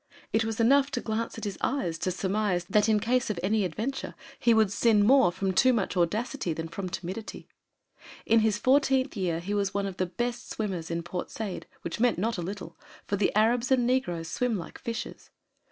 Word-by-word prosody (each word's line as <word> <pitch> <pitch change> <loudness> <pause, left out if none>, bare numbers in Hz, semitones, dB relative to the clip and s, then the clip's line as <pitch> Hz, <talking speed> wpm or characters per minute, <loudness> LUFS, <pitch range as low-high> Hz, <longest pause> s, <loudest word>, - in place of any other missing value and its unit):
It 225 - +3
was 225 +1 -3
enough 275 +4 +4
to 245 - 0
glance 225 0 -3
at 225 - -7
his 205 -3 -4
eyes 175 -12 -1
to - - -1
surmise 190 0 0
that 210 +1 +4
in 215 -1 +4
case 245 +3 +1
of 205 -5 -2
any 210 +2 +2
adventure 220 +10 -3 0.2
he 235 - +3
would 220 -3 +4
sin 210 -1 +3
more 265 -4 +6
from 190 +1 -2
too 255 +7 +5
much 205 -5 -1
audacity 210 - 0
than 160 +1 -5
from 185 +2 -5
timidity. 185 +5 -6 0.8
In 225 +1 +5
his 215 -1 +2
fourteenth 265 +2 +2
year, 175 -5 -1
he 190 +4 -4
was 200 -1 -1
one 200 0 0
of 195 -2 -5
the 185 - 0
best 240 +7 -3
swimmers 185 -7 -3
in 170 0 -2
Port 175 +1 -5
Said, 210 -4 -5 0.2
which 170 - -4
meant 245 0 +3
not 220 +2 -1
a - - -2
little, 175 -2 -6 0.3
for 200 - -1
the 200 0 +1
Arabs 230 +3 +3
and 255 -2 +3
negroes 180 -10 0
swim 235 +6 -1
like 170 - -8
fishes. 230 -1 -6
210 Hz, 205 wpm, -28 LUFS, 185-235 Hz, 0.8 s, more